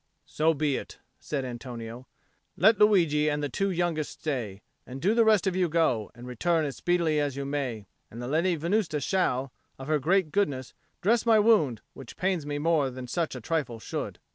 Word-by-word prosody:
"So 160 Hz, +1 st, +1 dB
be 145 Hz, -2 st, 0 dB
it," -, -, -8 dB, 0.2 s
said 140 Hz, -3 st, -3 dB
Antonio. 120 Hz, 0 st, -7 dB, 0.5 s
"Let 215 Hz, +3 st, +5 dB
Luigi 165 Hz, -8 st, +4 dB
and 150 Hz, 0 st, -1 dB
the 145 Hz, -, -1 dB
two 195 Hz, +9 st, -1 dB
youngest 175 Hz, -4 st, -2 dB
stay; 115 Hz, -10 st, -4 dB, 0.2 s
and 130 Hz, +2 st, -8 dB
do 195 Hz, +9 st, +2 dB
the 230 Hz, 0 st, +4 dB
rest 215 Hz, -3 st, +4 dB
of 190 Hz, -2 st, 0 dB
you 180 Hz, -2 st, +1 dB
go, 150 Hz, -10 st, +1 dB
and 120 Hz, +1 st, -11 dB
return 155 Hz, +7 st, 0 dB
as 140 Hz, -, -5 dB
speedily 170 Hz, -3 st, +1 dB
as 145 Hz, -2 st, -1 dB
you 140 Hz, -, -3 dB
may. 135 Hz, -7 st, -3 dB, 0.2 s
And 115 Hz, -, -10 dB
the 120 Hz, -, -5 dB
Lady 170 Hz, +6 st, +1 dB
Venusta 170 Hz, 0 st, 0 dB
shall, 135 Hz, -5 st, 0 dB, 0.2 s
of 135 Hz, -, -8 dB
her 155 Hz, -1 st, +2 dB
great 175 Hz, +2 st, +2 dB
goodness, 140 Hz, -11 st, -1 dB, 0.3 s
dress 225 Hz, +4 st, +3 dB
my 230 Hz, -2 st, +5 dB
wound, 205 Hz, -, +3 dB
which 130 Hz, -, -11 dB
pains 180 Hz, -5 st, -1 dB
me 145 Hz, 0 st, -2 dB
more 150 Hz, -2 st, +2 dB
than 130 Hz, 0 st, -7 dB
such 160 Hz, +3 st, -2 dB
a 125 Hz, -, -7 dB
trifle 140 Hz, -4 st, -2 dB
should." -, -, -5 dB
150 Hz, 195 wpm, -27 LUFS, 130-175 Hz, 0.5 s, Let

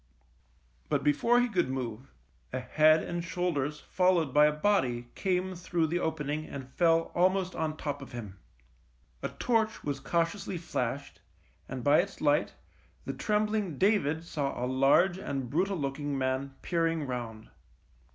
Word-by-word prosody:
But -, -, +1 dB
before 235 Hz, +12 st, +3 dB
he 245 Hz, -, +3 dB
could 180 Hz, -, 0 dB
move, 130 Hz, -1 st, -5 dB, 0.4 s
a -, -, -2 dB
head 155 Hz, +4 st, +4 dB
and 175 Hz, -1 st, -3 dB
shoulders 150 Hz, -5 st, -2 dB
followed 180 Hz, -6 st, +2 dB
by 150 Hz, 0 st, +7 dB
a -, -, +2 dB
body 130 Hz, -9 st, 0 dB
came 185 Hz, -1 st, -1 dB
through 175 Hz, -2 st, -1 dB
the 170 Hz, +3 st, -1 dB
opening 155 Hz, -2 st, -2 dB
and 130 Hz, -2 st, -8 dB
fell 165 Hz, -1 st, +3 dB
almost 185 Hz, +1 st, +2 dB
on 155 Hz, -1 st, -2 dB
top 145 Hz, -2 st, -4 dB
of 135 Hz, -, -10 dB
him. 105 Hz, -6 st, -8 dB, 0.8 s
A -, -, -2 dB
torch 225 Hz, -2 st, 0 dB
was 140 Hz, -2 st, -2 dB
cautiously 170 Hz, +5 st, -1 dB
flashed, 140 Hz, -4 st, -4 dB, 0.5 s
and 130 Hz, -2 st, -5 dB
by 145 Hz, +1 st, +5 dB
its 200 Hz, +2 st, -8 dB
light 145 Hz, -1 st, +2 dB, 0.5 s
the -, -, -3 dB
trembling 210 Hz, -6 st, 0 dB
David 165 Hz, -5 st, +2 dB
saw 145 Hz, -4 st, -3 dB
a 125 Hz, -, -1 dB
large 135 Hz, +8 st, +3 dB
and 135 Hz, -9 st, -4 dB
brutal 190 Hz, +5 st, +1 dB
looking 145 Hz, 0 st, -2 dB
man 130 Hz, +1 st, -1 dB
peering 165 Hz, -3 st, 0 dB
round. 120 Hz, -4 st, -5 dB
155 Hz, 150 wpm, -30 LUFS, 135-180 Hz, 0.8 s, by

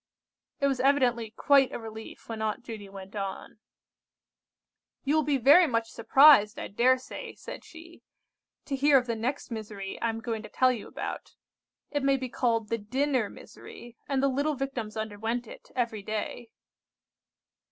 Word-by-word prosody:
It 280 Hz, -, +1 dB
was 270 Hz, -2 st, +1 dB
evidently 255 Hz, -4 st, +2 dB
quite 270 Hz, +4 st, +3 dB
a -, -, -4 dB
relief 220 Hz, -1 st, -10 dB
when 225 Hz, -1 st, -5 dB
Aunt 220 Hz, +3 st, -2 dB
Judy 215 Hz, -5 st, -8 dB
went 195 Hz, +1 st, -11 dB
on:— 195 Hz, +1 st, -5 dB, 1.4 s
"You 285 Hz, -, +1 dB
will 310 Hz, -, +4 dB
be 290 Hz, -1 st, +1 dB
very 290 Hz, +8 st, +7 dB
much 230 Hz, -3 st, -1 dB
surprised, 235 Hz, -3 st, +6 dB
I -, -, -5 dB
dare 250 Hz, +5 st, +4 dB
say," 255 Hz, -, -9 dB
said -, -, -9 dB
she, 335 Hz, +1 st, -14 dB, 0.6 s
"to 275 Hz, -, -2 dB
hear 280 Hz, +1 st, +5 dB
of 255 Hz, -, +1 dB
the 235 Hz, -2 st, -2 dB
next 250 Hz, +4 st, -3 dB
misery 210 Hz, -3 st, -6 dB
I 230 Hz, -, +1 dB
am 225 Hz, 0 st, -3 dB
going 225 Hz, -2 st, -3 dB
to 215 Hz, -, -10 dB
tell 255 Hz, 0 st, +3 dB
you 235 Hz, -5 st, -5 dB
about. -, -, -6 dB, 0.6 s
It 290 Hz, -, -1 dB
may 275 Hz, 0 st, +3 dB
be 260 Hz, -1 st, -5 dB
called 230 Hz, -3 st, 0 dB
the 230 Hz, -, -1 dB
dinner 255 Hz, +1 st, 0 dB
misery, 240 Hz, 0 st, -12 dB
and 275 Hz, -1 st, +1 dB
the -, -, +5 dB
little 285 Hz, +3 st, 0 dB
Victims 250 Hz, -5 st, -4 dB
underwent 220 Hz, +3 st, -3 dB
it -, -, -13 dB
every 230 Hz, -4 st, -1 dB
day." 215 Hz, +3 st, -4 dB
240 Hz, 170 wpm, -28 LUFS, 220-275 Hz, 1.4 s, very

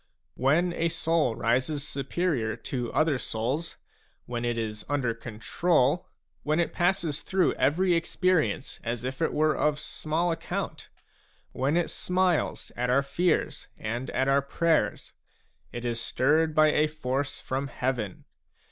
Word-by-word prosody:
When 165 Hz, +7 st, +2 dB
a 170 Hz, 0 st, 0 dB
soul 165 Hz, -6 st, +1 dB
rises 130 Hz, +6 st, 0 dB
superior 135 Hz, -5 st, -1 dB
to 125 Hz, -3 st, -4 dB
other 155 Hz, -4 st, +2 dB
souls, 130 Hz, +11 st, -3 dB, 0.5 s
when 120 Hz, -1 st, -4 dB
it 120 Hz, -1 st, 0 dB
is 110 Hz, -2 st, -3 dB
under 135 Hz, -5 st, +1 dB
control, 125 Hz, +7 st, 0 dB, 0.3 s
when 155 Hz, +2 st, +1 dB
it 170 Hz, -, 0 dB
passes 175 Hz, -4 st, +1 dB
through 190 Hz, -1 st, +2 dB
every 180 Hz, +5 st, +2 dB
experience 165 Hz, -3 st, +1 dB
as 120 Hz, 0 st, -3 dB
if 130 Hz, +4 st, -4 dB
it 160 Hz, -, +2 dB
were 155 Hz, 0 st, +2 dB
of 150 Hz, -1 st, +1 dB
small 160 Hz, +4 st, -1 dB
account, 165 Hz, -, -4 dB, 0.6 s
when 140 Hz, +5 st, +1 dB
it 175 Hz, -, 0 dB
smiles 180 Hz, -2 st, 0 dB
at 125 Hz, 0 st, -1 dB
our 135 Hz, +3 st, +4 dB
fears 170 Hz, +5 st, 0 dB
and 120 Hz, +4 st, -4 dB
at 130 Hz, +1 st, 0 dB
our 135 Hz, +1 st, +4 dB
prayers, 150 Hz, -4 st, 0 dB, 0.6 s
it 120 Hz, 0 st, -6 dB
is 120 Hz, -1 st, -1 dB
stirred 155 Hz, +7 st, +2 dB
by 155 Hz, 0 st, +6 dB
a 155 Hz, +1 st, +3 dB
force 140 Hz, -2 st, -3 dB
from 135 Hz, +2 st, -3 dB
heaven. 125 Hz, -7 st, -3 dB
145 Hz, 140 wpm, -27 LUFS, 125-165 Hz, 0.6 s, by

